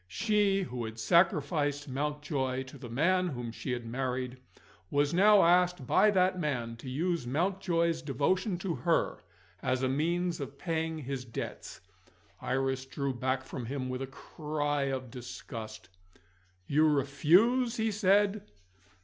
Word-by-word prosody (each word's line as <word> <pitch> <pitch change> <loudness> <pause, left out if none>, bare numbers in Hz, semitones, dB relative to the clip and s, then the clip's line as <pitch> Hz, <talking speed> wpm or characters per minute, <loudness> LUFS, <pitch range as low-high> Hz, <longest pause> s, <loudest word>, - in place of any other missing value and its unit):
She, 205 - +1
who 125 -7 -4
had 110 0 -7
sacrificed 145 -1 +2
Mountjoy 140 -1 -2
to 130 +1 -12
the 120 -2 -8
man 180 +9 +2
whom 120 -7 -4
she 125 - -5
had 120 -1 -3
married, 125 +1 -3 0.5
was 145 +1 +1
now 205 +3 +6
asked 180 -3 +3
by 215 - +4
that 185 -2 +2
man 125 -7 -2
to 130 +3 -8
use 165 +1 -1
Mountjoy's 170 +2 0
devotion 175 - 0
to 180 -1 -2
her, 125 -5 0 0.4
as 130 0 0
a - - +3
means 170 +5 0
of 140 0 -6
paying 160 -1 -2
his 135 -3 -4
debts! 115 -2 -7 0.6
Iris 130 0 -1
drew 140 0 -2
back 130 +1 -1
from 125 -2 -6
him 130 0 -3
with 130 +1 -3
a 135 - -3
cry 145 0 -3
of 130 -3 -3
disgust. 110 -4 -8 0.8
"You 155 +7 +3
refuse?" 175 - +3
he 220 0 +1
said. 205 0 +2
145 Hz, 140 wpm, -30 LUFS, 130-175 Hz, 0.8 s, now